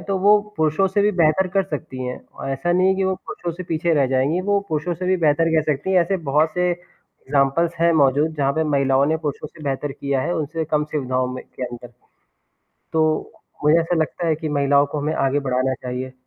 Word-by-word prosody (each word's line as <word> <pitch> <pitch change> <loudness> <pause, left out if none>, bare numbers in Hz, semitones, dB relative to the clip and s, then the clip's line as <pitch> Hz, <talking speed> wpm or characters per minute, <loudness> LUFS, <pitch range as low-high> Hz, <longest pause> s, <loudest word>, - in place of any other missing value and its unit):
तो 195 -1 -2
वो 205 +2 +5 0.2
पुरुषों 160 +5 +2
से 200 +2 +1
भी 205 - +3
बेहतर 170 +2 +3
कर 195 - +5
सकती 150 -6 -6
हैं। 125 - -4 0.2
अ, - - -4
ऐसा 135 +6 -1
नहीं 185 +1 +3
है 190 - +3
कि 195 - 0
वो 190 0 +1
पुरुषों 175 -1 -6
से 185 - -5
पीछे 165 0 0
रह 140 -3 +3
जाएँगी, 135 +7 +1
वो 200 +1 +1
पुरुषों 160 +3 -1
से 180 +2 -5
भी 185 - +3
बेहतर 165 -1 +2
कर 155 - +3
सकती 145 +7 -3
हैं 185 - +5
ऐसे 190 +3 -1
बहुत 155 +3 +3
से 180 0 +1
एग्ज़ाम्पल्स 165 -2 -1
हैं 170 0 +4
मौजूद 150 +1 +3
जहाँ 140 -1 +1
पे 160 +2 0
महिलाओं 140 -2 +2
ने 160 - +1
पुरुषों 150 -1 -4
से 155 0 -15
बेहतर 140 +1 -2
किया 140 -1 -2
है, 175 - -1
उनसे 160 +1 -2
कम 150 -1 0
सुविधाओं 130 -4 -1
में 130 - -6
के 130 - -6
अंदर। 120 0 -10 1.0
तो 155 -1 +1 0.3
मुझे 150 +3 +5
ऐसा 165 +1 -1
लगता 165 +1 -1
है 160 - +2
कि 155 0 -5
महिलाओं 140 0 +3
को 150 - -2
हमें 150 +2 -1
आगे 135 +1 +1
बढ़ाना 130 -1 0
चाहिए। 125 +1 -5
155 Hz, 225 wpm, -21 LUFS, 140-170 Hz, 1.0 s, वो